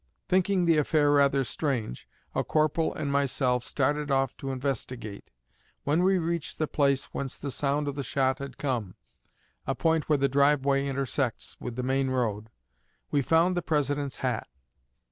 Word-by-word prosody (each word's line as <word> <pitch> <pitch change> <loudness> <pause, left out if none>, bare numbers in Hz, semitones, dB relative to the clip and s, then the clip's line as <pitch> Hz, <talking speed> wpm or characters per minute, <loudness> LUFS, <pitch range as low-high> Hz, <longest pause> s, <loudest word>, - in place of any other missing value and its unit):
Thinking 185 0 +2
the 165 -2 +4
affair 150 -1 +3
rather 140 -1 +4
strange, 125 - -3 0.2
a - - 0
corporal 155 +1 +1
and 145 -2 -3
myself 130 -3 +1
started 145 +3 0
off 135 -2 +1
to 135 - -5
investigate. 130 -5 -4 0.5
When 150 +4 +2
we 190 +1 +4
reached 170 -2 -2
the 155 - +1
place 140 -2 +1
whence 135 -2 -4
the 140 - -5
sound 145 +3 0
of 140 - -1
the 140 - -4
shot 130 -1 0
had 140 -2 -7
come 120 -9 -2 0.7
a - - 0
point 160 -2 +1
where 150 - +4
the 140 0 +2
driveway 140 0 +3
intersects, 135 -2 -2
with 120 -2 -6
the 125 - -3
main 135 +1 +1
road 110 -4 -1 0.6
we 145 - +3
found 165 +7 +3
the 175 - 0
President's 145 -3 -1
hat. 120 -4 -1
140 Hz, 165 wpm, -28 LUFS, 130-150 Hz, 0.7 s, the